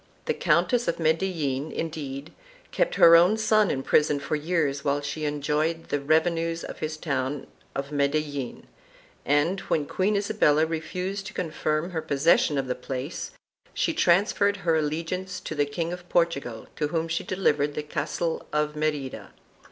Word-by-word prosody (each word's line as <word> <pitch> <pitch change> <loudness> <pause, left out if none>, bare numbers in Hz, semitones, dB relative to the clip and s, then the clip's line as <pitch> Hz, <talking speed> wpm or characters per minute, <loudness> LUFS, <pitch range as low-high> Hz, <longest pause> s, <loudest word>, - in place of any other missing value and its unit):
The - - +1
Countess 245 -1 +2
of - - 0
Medellin, 160 -4 0
indeed, 150 -3 -5 0.4
kept - - +1
her 170 0 +8
own 180 +6 +6
son 215 -2 +3
in 135 - -1
prison 150 0 +3
for 140 - -2
years 150 -3 0
while 145 -1 +1
she 145 +2 -4
enjoyed 150 +3 -1
the 145 - 0
revenues 165 +3 +1
of - - -7
his 155 0 -3
town 140 -2 -2 0.3
of 140 +1 -4
Medellin 145 -2 -1 0.6
and, 145 +7 +2
when 150 - +1
Queen 195 +7 0
Isabella 200 -7 +3
refused 180 +5 -4
to 210 - -10
confirm 155 0 -1
her 165 -2 -2
possession 145 0 +3
of 135 - 0
the 125 - -1
place, 135 - -5 0.5
she - - +1
transferred 200 - +3
her 165 -1 +3
allegiance 165 +4 -2
to - - -5
the 145 -1 +1
King 165 +4 -3
of 180 0 -9
Portugal 140 -10 0
to 150 - 0
whom 165 +1 -1
she 165 0 -2
delivered 150 -6 +1
the 150 - -2
castle 165 +2 -3
of 150 0 0
Merida. 150 -3 -3
155 Hz, 160 wpm, -26 LUFS, 145-175 Hz, 0.6 s, her